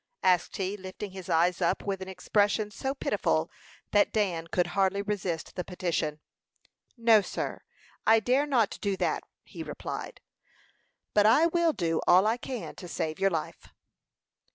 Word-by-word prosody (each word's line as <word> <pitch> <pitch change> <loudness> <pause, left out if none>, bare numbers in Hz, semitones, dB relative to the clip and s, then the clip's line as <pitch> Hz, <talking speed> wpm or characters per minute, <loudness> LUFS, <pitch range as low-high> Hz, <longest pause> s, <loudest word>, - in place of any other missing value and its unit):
asked 180 -2 +2
he, 195 +1 -2
lifting 190 +1 -7
his 190 -1 -9
eyes 175 +2 +2
up 170 - +1
with 195 -2 -2
an 190 - -6
expression 205 +2 +1
so 265 +6 -3
pitiful - - 0 0.4
that 205 -1 +4
Dan 180 -6 0
could 175 +1 +1
hardly 195 0 +1
resist 190 -6 -3
the 180 - -2
petition. 170 -5 -2 0.8
"No, 230 -2 +6
sir. - - -4 0.5
I 225 0 +7
dare 255 +6 +2
not 235 -7 +1
do 200 -2 -1
that," - - 0 0.2
he - - -10
replied. - - -6 0.9
"But 210 0 +5
I 270 +9 +6
will 340 0 +3
do 165 - 0
all 185 +3 +6
I 225 +2 +2
can 250 -2 -6
to 180 - -8
save 155 -1 -3
your 195 0 +3
life." 165 -4 -4
195 Hz, 155 wpm, -28 LUFS, 180-220 Hz, 0.9 s, I